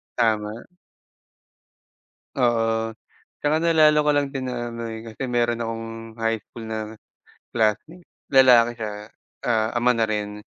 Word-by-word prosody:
Tama. 110 -1 0 1.7
Oo. 115 -3 +1 0.5
Tsaka 155 +2 +1
naalala 155 -2 +5
ko 150 - +1
lang 145 -1 +2
din 130 -2 -3
na 120 -1 -4
may 115 -1 -6
kasi 115 +3 -5
meron 120 -1 +1
akong 115 0 -4 0.3
high 115 0 0
school 115 - -11
na 110 0 -4 0.8
classmate, 120 - 0 0.2
lalaki 125 -3 +6
siya, 110 -2 -4 0.6
ah, 110 -1 +1
ama 125 +1 +3
na 115 - +2
rin, 105 -1 -3
115 Hz, 125 wpm, -23 LUFS, 110-130 Hz, 1.7 s, lalaki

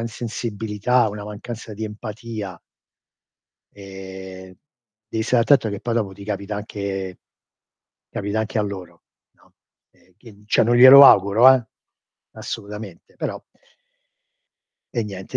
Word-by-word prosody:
insensibilità, 115 0 -1
una 105 0 -7
mancanza 110 +2 -8
di 110 +2 -5
empatia. 110 -2 -7 1.1
Ehm, 95 -1 -11 0.5
devi 110 - -2
stare 120 0 +2
attento 135 -4 +3
che 100 -1 -5
poi 120 - -3
dopo 105 -5 -1
ti 100 +1 -12
capita 100 0 -4
anche 100 -3 -5 0.9
capita 100 +2 -3
anche 110 +1 -3
a 105 - +2
loro, 90 -4 -8 0.3
no, - - -29 0.4
e 95 - -30
quindi 105 -4 -17
cioè - - +3
non 120 +2 +2
glielo 130 +3 +10
auguro, 110 +5 +7
eh, 125 -3 -2 0.7
assolutamente, 105 -3 -9
però - - -4 1.5
E 115 -3 -1
niente, 95 -2 -6
105 Hz, 120 wpm, -21 LUFS, 100-115 Hz, 1.5 s, glielo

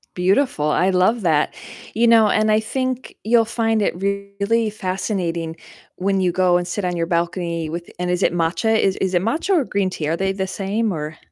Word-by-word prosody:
Beautiful, 185 - +1
I 185 - +2
love 190 +5 +2
that. 160 -5 +1 0.4
You 235 +2 +3
know, 225 -2 +6
and 215 0 +2
I 215 - +4
think 255 +3 -3
you'll 230 +1 +4
find 225 -1 0
it - - 0
really 200 +3 -1
fascinating 185 -4 -3 0.4
when 195 +1 0
you 180 -1 +2
go 180 0 +3
and 175 0 -3
sit 195 +3 -3
on 180 -1 -1
your 165 - 0
balcony 170 -1 -2
with 170 +2 -5
and 180 0 -1
is 180 +1 0
it - - +2
matcha, 175 +6 +1
is 190 -1 +2
is 190 -1 -1
it 175 - +3
matcha 290 - -2
or 315 - +3
green 200 -5 -1
tea, 155 -4 -4
are 165 +2 0
they 195 0 0
the 190 0 -3
same, 205 +3 -1
or 155 -2 -5
190 Hz, 205 wpm, -21 LUFS, 175-220 Hz, 0.4 s, know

